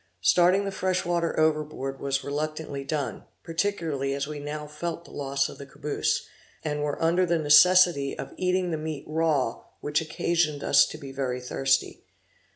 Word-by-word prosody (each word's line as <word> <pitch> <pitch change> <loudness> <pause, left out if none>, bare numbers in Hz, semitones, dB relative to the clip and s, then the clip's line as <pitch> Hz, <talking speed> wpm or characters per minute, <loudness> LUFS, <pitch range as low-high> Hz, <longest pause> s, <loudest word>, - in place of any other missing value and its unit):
Starting 180 - +4
the 195 - -2
fresh 185 -1 -1
water 170 -2 0
overboard 150 -3 0
was 135 0 -1
reluctantly 150 -1 -4
done, 145 0 -3 0.2
particularly 165 -6 -1
as 140 0 -2
we 150 0 -6
now 150 +1 -5
felt 165 +3 -5
the - - -14
loss 140 0 -1
of - - -11
the 140 - -7
caboose, 145 +1 -1 0.4
and 150 -1 -2
were 145 -1 -2
under 170 +3 +3
the 170 -1 +2
necessity 160 -1 +5
of - - -7
eating 180 -1 0
the 160 - -1
meat 155 -2 -5
raw 155 -6 0 0.2
which 150 +1 0
occasioned 155 -1 0
us - - +5
to - - -8
be 140 -3 -9
very 130 -2 -2
thirsty. 135 +2 0
150 Hz, 165 wpm, -26 LUFS, 140-170 Hz, 0.4 s, necessity